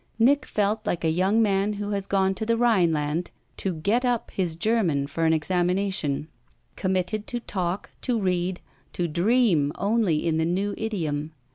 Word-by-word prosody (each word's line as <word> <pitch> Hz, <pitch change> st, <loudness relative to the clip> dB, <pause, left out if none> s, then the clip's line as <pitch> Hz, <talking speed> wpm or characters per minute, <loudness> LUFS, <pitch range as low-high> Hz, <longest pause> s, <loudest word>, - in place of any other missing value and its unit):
Nick 270 Hz, +6 st, +3 dB
felt 210 Hz, +1 st, 0 dB
like 175 Hz, -6 st, -2 dB
a 160 Hz, -, +2 dB
young 190 Hz, +7 st, +3 dB
man 200 Hz, 0 st, +1 dB
who 205 Hz, 0 st, -4 dB
has 200 Hz, -1 st, -2 dB
gone 190 Hz, -1 st, +2 dB
to 190 Hz, -, -5 dB
the 230 Hz, +1 st, +1 dB
Rhineland 170 Hz, -8 st, +2 dB, 0.3 s
to 185 Hz, -3 st, -2 dB
"get 205 Hz, +11 st, +1 dB
up" 245 Hz, -2 st, 0 dB
his 175 Hz, -4 st, -2 dB
German 170 Hz, -7 st, +1 dB
for 160 Hz, +4 st, -2 dB
an 160 Hz, -, +4 dB
examination 175 Hz, -2 st, 0 dB, 0.5 s
committed 190 Hz, +3 st, -1 dB
to 240 Hz, -, -3 dB
talk, 185 Hz, -4 st, -3 dB
to 245 Hz, -3 st, 0 dB
read, 180 Hz, -1 st, -1 dB, 0.3 s
to 175 Hz, -, -1 dB
dream 175 Hz, -, +2 dB
only 200 Hz, -7 st, +1 dB
in 160 Hz, -1 st, +1 dB
the 160 Hz, -, +1 dB
new 195 Hz, +4 st, 0 dB
idiom. 160 Hz, -8 st, -3 dB
190 Hz, 165 wpm, -25 LUFS, 165-215 Hz, 0.5 s, an